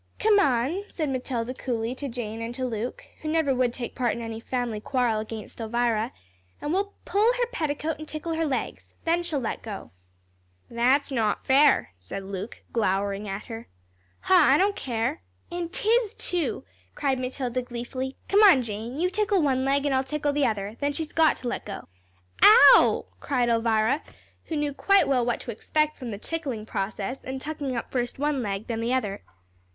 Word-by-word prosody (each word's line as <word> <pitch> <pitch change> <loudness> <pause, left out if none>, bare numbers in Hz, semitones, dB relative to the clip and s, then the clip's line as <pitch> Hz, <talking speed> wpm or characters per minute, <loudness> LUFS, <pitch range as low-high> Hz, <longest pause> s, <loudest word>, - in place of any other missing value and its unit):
"Come 425 -1 +4
on," 285 +5 +1
said 310 -7 -3
Matilda, 255 -2 -2
coolly, 240 -2 -2
to 275 +1 -5
Jane, 230 -2 -5
and 230 +1 -4
to 255 - -2
Luke, 235 0 -4 0.2
who 310 - -3
never 315 -3 +2
would 250 -1 +2
take 240 0 -6
part 245 -2 0
in 235 - -5
any 225 -1 -5
family 240 -2 -2
quarrel 245 -3 +1
against 220 +1 -7
Elvira, 230 0 0 0.5
"and 295 - -2
we'll 400 +2 -1
pull 425 +4 +3
her - - +1
petticoat 310 -5 -2
and 310 - -8
tickle 315 +2 -4
her 325 0 0
legs. 270 - -4
Then 335 +1 +2
she'll 340 -4 -2
let 240 - -3
go." 210 -3 -7 0.8
"That's 255 +5 +2
not 220 -5 0
fair," 275 - +4
said 90 - -7
Luke, 195 +3 -7
glowering 200 -1 0
at 195 +1 -5
her. 225 0 -8 0.5
"Huh, - - +1
I 290 -3 +6
don't 400 +3 +2
care." 230 - -2 0.3
"An' 345 -1 -3
'tis, 440 +3 +1
too," 325 -10 -2 0.3
cried 270 -2 0
Matilda, 255 -1 -2
gleefully. 250 +2 -5
"Come 405 +2 +4
on, 370 -12 +7
Jane, 230 +5 -5
you 360 +2 +1
tickle 410 -3 +2
one 260 -2 +2
leg, 275 +1 +1
and 285 - +1
I'll 260 0 +2
tickle 290 +1 -1
the 285 -1 +2
other, 210 -4 -1
and 210 +3 -9
then 285 0 0
she's 315 +1 -4
got 320 -1 +4
to 250 - -6
let 240 - -3
go." 200 - -7 0.5
"Ow," 440 +4 +8
cried 250 -4 0
Elvira, 230 +4 +2 0.4
who 325 - -4
knew 295 -1 -1
quite 395 +7 +4
well 255 -3 +2
what 240 0 0
to 240 - -5
expect 305 +7 0
from 250 -3 -5
the 205 - -4
tickling 265 -4 -4
process, 205 +4 -3
and 265 +1 -5
tucking 290 -2 -4
up 235 - -4
first 245 -2 -2
one 290 -1 0
leg, 200 -1 -3
then 230 -2 -3
the 240 +3 +1
other. 205 -6 -2
255 Hz, 190 wpm, -26 LUFS, 230-305 Hz, 0.8 s, Ow